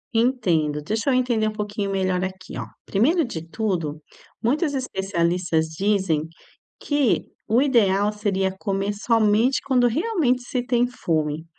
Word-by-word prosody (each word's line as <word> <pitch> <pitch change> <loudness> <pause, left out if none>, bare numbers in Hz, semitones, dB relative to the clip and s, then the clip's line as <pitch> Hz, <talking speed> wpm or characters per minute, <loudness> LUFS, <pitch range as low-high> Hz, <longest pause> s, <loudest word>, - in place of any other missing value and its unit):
Entendo, 175 - +1
deixa 220 - -2
eu - - +3
entender 240 -4 +1
um - - -1
pouquinho 205 -1 -3
melhor 185 -1 0
aqui, 185 0 -6
ó. - - -5 0.2
Primeiro 295 - +2
de 165 -9 -5
tudo 170 -8 -2 0.4
muitos 285 +4 +1
especialistas 180 -8 0
dizem 185 -3 0 0.5
que 290 -5 +1 0.2
o 235 +4 +3
ideal 210 -7 +3
seria 195 -3 -1
comer 195 0 -1
somente 225 +3 +2
quando 250 -2 +2
realmente 295 - +1
se 245 0 -3
tem 245 0 +2
fome. 160 -8 -2
210 Hz, 135 wpm, -23 LUFS, 185-245 Hz, 0.5 s, eu